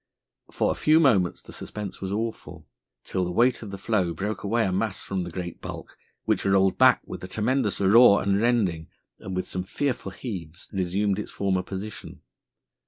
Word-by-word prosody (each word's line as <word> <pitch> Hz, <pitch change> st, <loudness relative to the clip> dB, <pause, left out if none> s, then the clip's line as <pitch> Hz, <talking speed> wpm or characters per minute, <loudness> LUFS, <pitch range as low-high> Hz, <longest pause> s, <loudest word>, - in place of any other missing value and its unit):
For -, -, 0 dB
a -, -, +1 dB
few 155 Hz, +1 st, +4 dB
moments 105 Hz, -, +3 dB
the -, -, -12 dB
suspense 105 Hz, -3 st, -7 dB
was 95 Hz, 0 st, -3 dB
awful, 110 Hz, +2 st, -4 dB, 0.4 s
till 95 Hz, -, -2 dB
the 90 Hz, -, -2 dB
weight 120 Hz, +7 st, +3 dB
of 110 Hz, -, -7 dB
the 100 Hz, -, -6 dB
floe 95 Hz, -5 st, 0 dB
broke 105 Hz, +1 st, -3 dB
away 115 Hz, +3 st, +1 dB
a 95 Hz, -, 0 dB
mass 100 Hz, +2 st, -1 dB
from 95 Hz, -, -3 dB
the 90 Hz, -, -4 dB
great 90 Hz, -1 st, -6 dB
bulk, -, -, -8 dB, 0.3 s
which -, -, +1 dB
rolled 95 Hz, -1 st, +3 dB
back -, -, +6 dB
with -, -, -8 dB
a -, -, -5 dB
tremendous 110 Hz, +3 st, 0 dB
roar 100 Hz, +2 st, +6 dB
and 100 Hz, +1 st, +1 dB
rending, 100 Hz, -10 st, +1 dB, 0.3 s
and, 95 Hz, -1 st, -6 dB
with 95 Hz, -, -2 dB
some 95 Hz, -, -3 dB
fearful 125 Hz, +1 st, -2 dB
heaves, 90 Hz, -, -7 dB
resumed 95 Hz, +2 st, 0 dB
its -, -, -5 dB
former 95 Hz, -2 st, 0 dB
position. 100 Hz, +3 st, -8 dB
100 Hz, 185 wpm, -26 LUFS, 95-110 Hz, 0.4 s, back